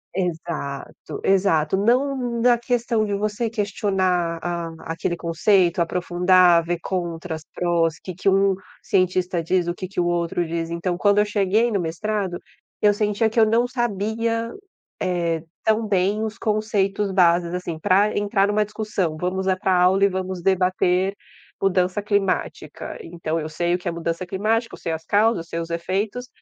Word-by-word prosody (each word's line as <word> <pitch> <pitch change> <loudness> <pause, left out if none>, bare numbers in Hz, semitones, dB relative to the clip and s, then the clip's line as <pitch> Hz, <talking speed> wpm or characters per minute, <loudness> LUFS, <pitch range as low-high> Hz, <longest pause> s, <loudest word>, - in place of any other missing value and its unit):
Exato. 165 -6 -4
Exato, 190 -4 +2
não 245 +2 +1
na 240 0 +5
questão 235 -2 0
de 205 - -2
você 210 +3 -1
questionar 190 -5 0
a 170 -2 -5
aquele 170 +1 -2
conceito, 170 +2 +2
aprofundar, 180 0 +4
ver 175 +1 -2
contras, 170 -3 -4
prós, 170 -2 +1
o - - -16
que 185 - -6
que 185 - -4
um 195 0 +4 0.3
cientista 185 -4 +1
diz, 175 +1 +1
o 175 - 0
que 185 +1 -6
que 190 - -5
o 175 - +2
outro 175 0 0
diz. 165 0 -3
Então, 175 +1 -2
quando 205 +2 +3
eu 210 - +4
cheguei 210 +3 +1
no 200 - +1
mestrado, 180 +2 -2 0.4
eu 210 - +6
sentia 210 +2 +1
que 225 - 0
eu 220 - +7
não 230 +3 +2
sabia, 230 -1 -1 0.5
eh, 170 -3 -1 0.2
tão 220 +1 +2
bem 200 +2 +1
os 220 0 -4
conceitos 210 -2 0
bases, 175 -2 +3
assim, 180 -2 -4
pra 205 +4 +3
entrar 205 -1 +2
numa 210 +1 +1
discussão. 210 -6 -2
Vamos 185 +2 -2
é 190 - +3
pra 185 0 0
a 180 0 +4
aula 190 +2 +4
e - - +3
vamos 185 -1 -4
debater 185 0 +2 0.5
mudança 185 +1 +1
climática. 195 -7 -2
Então, 165 -1 -3
eu 155 - -4
sei 170 +2 0
o - - 0
que 180 - -8
é - - +1
mudança 170 +1 -3
climática, 215 +5 -1
eu - - -9
sei 170 - -3
as 160 0 -5
causas, 220 +3 +3
eu 165 - -4
sei 165 - -3
os 165 0 -5
efeitos, 195 +8 -2
185 Hz, 175 wpm, -22 LUFS, 175-210 Hz, 0.5 s, eu